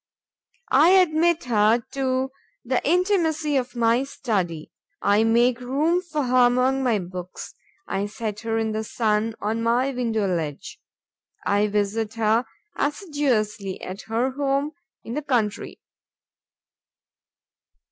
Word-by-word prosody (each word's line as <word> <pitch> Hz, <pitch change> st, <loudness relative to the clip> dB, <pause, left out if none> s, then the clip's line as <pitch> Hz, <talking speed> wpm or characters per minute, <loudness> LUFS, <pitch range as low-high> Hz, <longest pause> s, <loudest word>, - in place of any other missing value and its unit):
I 315 Hz, +4 st, +6 dB
admit 335 Hz, -1 st, +2 dB
her 225 Hz, 0 st, +3 dB
to 265 Hz, -1 st, -1 dB, 0.3 s
the 250 Hz, +1 st, 0 dB
intimacy 325 Hz, -3 st, +1 dB
of 255 Hz, -2 st, -1 dB
my 235 Hz, +2 st, +2 dB
study, 190 Hz, -, -3 dB, 0.3 s
I 205 Hz, +2 st, +3 dB
make 235 Hz, +2 st, +3 dB
room 300 Hz, +8 st, +1 dB
for 310 Hz, -5 st, -3 dB
her 250 Hz, -1 st, +4 dB
among 255 Hz, +2 st, +2 dB
my 245 Hz, -4 st, +2 dB
books, 180 Hz, -1 st, -7 dB, 0.3 s
I 200 Hz, +1 st, -2 dB
set 210 Hz, 0 st, -5 dB
her 225 Hz, 0 st, -2 dB
in 220 Hz, -1 st, 0 dB
the 215 Hz, 0 st, -2 dB
sun 220 Hz, 0 st, 0 dB
on 220 Hz, +2 st, -2 dB
my 240 Hz, +4 st, +1 dB
window 230 Hz, -5 st, -1 dB
ledge, 165 Hz, -6 st, -3 dB, 0.7 s
I 205 Hz, +1 st, +2 dB
visit 210 Hz, +2 st, -1 dB
her 225 Hz, +2 st, +2 dB, 0.3 s
assiduously 255 Hz, -, -1 dB
at 185 Hz, +2 st, -6 dB
her 235 Hz, +4 st, 0 dB
home, 280 Hz, +2 st, -1 dB, 0.3 s
in 230 Hz, -, -6 dB
the 300 Hz, -, -2 dB
country. 230 Hz, -7 st, -1 dB
235 Hz, 125 wpm, -24 LUFS, 215-275 Hz, 0.7 s, I